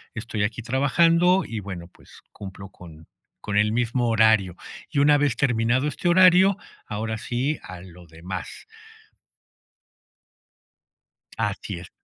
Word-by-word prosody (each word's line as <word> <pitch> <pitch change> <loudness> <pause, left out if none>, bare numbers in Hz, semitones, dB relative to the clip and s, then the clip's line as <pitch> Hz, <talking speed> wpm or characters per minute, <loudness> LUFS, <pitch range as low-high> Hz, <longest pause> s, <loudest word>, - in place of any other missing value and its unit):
estoy 110 -2 -3
aquí 110 +3 -3
trabajando 165 - +3
y, 110 -2 -5
bueno, 90 -4 -8
pues - - -19
cumplo 95 -1 -10
con 80 -4 -14 0.3
con 100 -1 -3
el 105 +1 +3
mismo 120 +1 0
horario. 110 -5 +3 0.4
Y 140 - 0
una 145 +1 +5
vez 145 -4 +1
terminado 125 +2 +1
este 160 - -3
horario, 185 +2 +5 0.3
ahora 110 +1 -4
sí 130 +6 -2
a 90 -1 -10
lo 90 -1 -14
demás. 85 +3 -8 2.7
Así - - -3
es. - - -12
115 Hz, 125 wpm, -23 LUFS, 95-140 Hz, 2.7 s, una